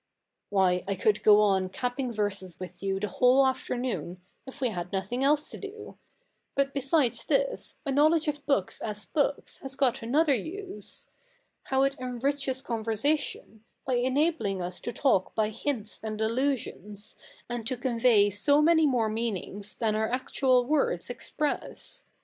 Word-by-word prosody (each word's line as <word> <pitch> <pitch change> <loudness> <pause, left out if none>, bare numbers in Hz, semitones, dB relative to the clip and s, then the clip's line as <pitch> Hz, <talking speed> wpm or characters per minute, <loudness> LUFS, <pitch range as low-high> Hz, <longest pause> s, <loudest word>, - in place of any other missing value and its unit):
Why, 185 -3 +2
I 200 - 0
could 210 +3 +1
go 210 0 +7
on 190 -3 +2
capping 250 +4 -3
verses 200 -5 -2
with 185 -1 -9
you 195 -1 -1
the 210 - -2
whole 255 +5 +4
afternoon, 250 -7 -2 0.3
if 265 +2 -10
we 255 -3 +1
had 180 -4 -5
nothing 200 +7 -2
else 295 +2 +3
to - - -8
do. 420 +1 -9 0.6
But 275 0 +1
besides 275 -1 +2
this, - - 0
a 275 - -1
knowledge 310 +3 +3
of 295 -1 -2
books 275 -11 0
as 210 -1 -3
books 285 -2 -1
has 270 0 -5
got 265 -3 +1
another 285 +6 +3
use. 375 - -5 0.6
How 265 0 +2
it 275 0 0
enriches 260 +1 -2
conversation, 225 0 -2 0.2
by 260 - -1
enabling 255 - +1
us 180 0 -5
to 240 - -4
talk 230 -7 +1
by 215 -1 +1
hints 220 -1 -3
and 215 -1 -4
allusions, 220 -4 -2 0.3
and 240 -2 -4
to 255 - -1
convey 235 -4 +3
so 285 +9 +3
many 320 0 +5
more 245 -5 +2
mean 220 -1 -1
ings 200 +3 -6
than 220 -2 0
our 220 0 0
actual 255 0 +2
words 255 - 0
express. 295 +4 -4
245 Hz, 155 wpm, -28 LUFS, 210-280 Hz, 0.6 s, go